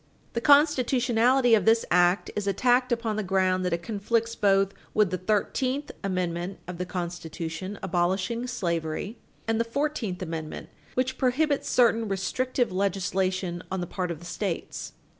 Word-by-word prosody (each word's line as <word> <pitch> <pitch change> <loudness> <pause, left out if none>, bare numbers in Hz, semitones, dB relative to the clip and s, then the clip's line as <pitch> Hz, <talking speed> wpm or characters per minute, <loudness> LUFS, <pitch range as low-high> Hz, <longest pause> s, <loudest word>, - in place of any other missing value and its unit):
The 235 - -1
constitutionality 255 -4 +4
of 210 -5 +4
this 225 +1 +4
act 180 +2 +3
is 210 -1 -2
attacked 245 +5 +2
upon 230 -2 0
the 215 - -1
ground 185 -1 +1
that 180 - 0
it 170 0 -1
conflicts 230 +1 -1
both 195 -2 +3 0.2
with 210 -4 +3
the 185 - 0
Thirteenth 255 - 0
Amendment 180 -1 -2
of 180 -1 -7
the 180 - -3
Constitution, 175 +1 -5
abolishing 190 +6 0
slavery, 170 -1 -3 0.3
and 225 0 +1
the - - +3
Fourteenth 230 -7 -2
Amendment, 160 -2 -6 0.3
which 260 +1 -1
prohibits 280 +3 +1
certain 230 -2 +3
restrictive 245 +6 -1
legislation 185 -2 -1
on 190 - -1
the 175 - -2
part 180 +1 -3
of 170 - -3
the 175 - -12
States. 175 0 -4
200 Hz, 150 wpm, -27 LUFS, 180-240 Hz, 0.3 s, constitutionality